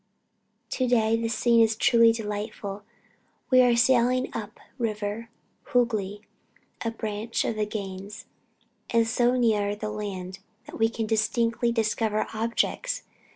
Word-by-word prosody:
To 255 - 0
day 225 -2 +3
the 230 0 -1
scene 230 +1 +3
is 225 -1 +3
truly 230 0 +5
delightful. 210 -2 -5 0.7
We 255 0 +7
are 245 -1 +4
sailing 250 +1 +3
up 215 -2 -5
the 245 - -11
river 215 +1 -4 0.4
Hoogly, 215 -5 +1 0.6
a 230 - 0
branch 220 0 -3
of 225 - -1
the 210 -1 -1
Ganges, 200 0 -6 0.6
and 230 -1 +3
so 245 +2 +2
near 210 -4 +2
the 210 +1 -4
land 195 -3 -5 0.3
that - - -10
we 225 0 +4
can 225 -1 -3
distinctly 230 +2 +1
discover 220 -1 0
objects. 235 - -1
225 Hz, 135 wpm, -26 LUFS, 210-235 Hz, 0.7 s, We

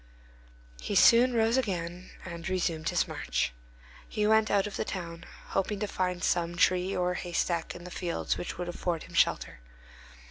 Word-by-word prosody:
He - - -3
soon 245 +2 +7
rose 225 +2 +3
again 180 -6 -2 0.2
and 170 0 -6
resumed 170 -4 -1
his - - +1
march. - - -2 0.6
He 210 - 0
went 220 0 +4
out 200 -1 +3
of 210 - -5
the - - -1
town, 170 -2 -6 0.2
hoping 195 +1 -1
to 210 - 0
find 180 -2 -2
some 175 0 0
tree 185 +1 +3
or 180 0 +1
haystack 170 -2 -2
in 175 - -9
the 180 - -9
fields 175 -2 -2
which - - -5
would 175 0 -4
afford 175 -1 -2
him - - -13
shelter. - - +1
180 Hz, 170 wpm, -29 LUFS, 170-200 Hz, 0.6 s, soon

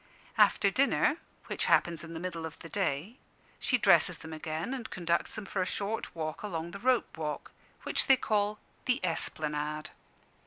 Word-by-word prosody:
After 200 - +5
dinner 280 +5 +3 0.3
(which - - -2
happens 170 -2 +3
in 165 0 -8
the - - -4
middle 170 -2 -4
of 160 -1 -6
the 165 - -10
day) 190 - -1 0.4
she 250 - +2
dresses 180 -5 +5
them 160 0 -9
again 155 +8 -3
and 250 -4 -5
conducts 170 -2 -1
them 215 - -5
for 190 0 -2
a - - +1
short 205 -1 -3
walk 155 -1 -4
along 170 -5 -4
the 200 - -7
Rope 245 -7 +1
walk, 150 -2 -4 0.3
which - - +2
they 270 - +7
call 210 -2 +1 0.3
"the 250 - +2
Esplanade." 150 -2 -2
170 Hz, 170 wpm, -31 LUFS, 160-210 Hz, 0.4 s, they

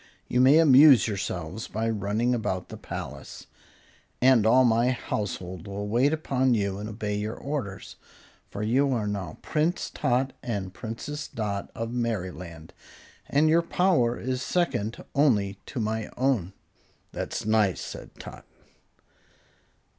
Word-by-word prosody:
"You 125 - +2
may 135 +4 +7
amuse 140 -6 +7
yourselves 95 -1 -4
by 110 +1 -2
running 110 +3 0
about 95 -6 -2
the - - -7
palace, - - -8 0.7
and 125 -4 +5
all 130 +3 +6
my 120 +1 +3
household 95 -7 -4
will 100 +1 -4
wait 120 +7 +3
upon 130 -5 +1
you 100 -2 -1
and 105 +1 -5
obey 105 -1 -3
your 105 +1 -3
orders; 130 -9 -5 0.5
for 100 - -5
you 130 +5 +2
are 115 -4 -1
now 100 -6 -4
Prince 160 +3 -1
Tot 130 +2 0
and 100 -5 -4
Princess 130 +8 -6
Dot 100 -3 -4
of 115 +1 -4
Merryland, 90 -8 -4 0.6
and 150 +3 +3
your 165 +2 +4
power 165 -9 +2
is 130 +1 -2
second 120 - -1
only 105 -9 +2
to 130 - -5
my 110 0 -2
own." 120 -9 0 0.6
"That's - - -4
nice," 105 -4 +2
said - - -8
Tot. - - -10
115 Hz, 135 wpm, -26 LUFS, 100-130 Hz, 0.7 s, may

